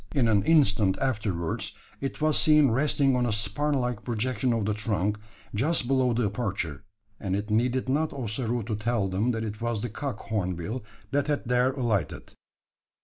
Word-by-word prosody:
In 130 -5 +3
an 105 -3 +4
instant 105 -12 +4
afterwards, 105 -10 -2 0.3
it 135 -1 -4
was 155 -1 +3
seen 150 -4 +5
resting 135 +1 +2
on 125 -1 +1
a - - 0
spur 110 +8 0
like 125 -5 -1
projection 125 +1 -1
of 115 -3 0
the 105 - +1
trunk, 105 -1 -1 0.3
just 130 +4 +1
below 130 -1 +3
the 120 0 +1
aperture; 100 - -2 0.4
and 95 -2 -1
it 105 +2 -3
needed 125 +4 +1
not 150 +4 +1
Ossaroo 120 -2 -2
to 110 +1 -2
tell 105 -2 0
them 100 +6 0
that 115 -2 -1
it 105 0 -5
was 115 -3 -1
the 120 - -2
cock 135 +5 -4
hornbill 100 +2 -3 0.3
that 145 0 +1
had 145 -1 0
there 125 +2 +2
alighted. 115 - -2
115 Hz, 175 wpm, -27 LUFS, 105-130 Hz, 0.4 s, seen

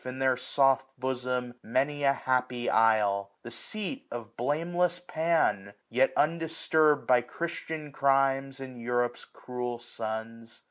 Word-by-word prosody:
In 125 0 -6
their 130 -1 +2
soft 135 +1 +1
bosom, 125 -1 -2
many 140 +5 0
a 140 0 +5
happy 125 -2 -1
isle; 105 -3 +3
The 120 - -8
seat 215 - -3
of 115 -1 -7
blameless 170 +7 0
Pan, 160 - 0 0.2
yet 130 +3 +3
undisturb'd 160 -1 +2
By 125 -1 +5
Christian 160 +2 -5
crimes 135 0 +2
and 130 -3 -8
Europe's 120 0 -1
cruel 125 -1 -5
sons. 115 -1 -6
130 Hz, 125 wpm, -29 LUFS, 120-145 Hz, 0.2 s, a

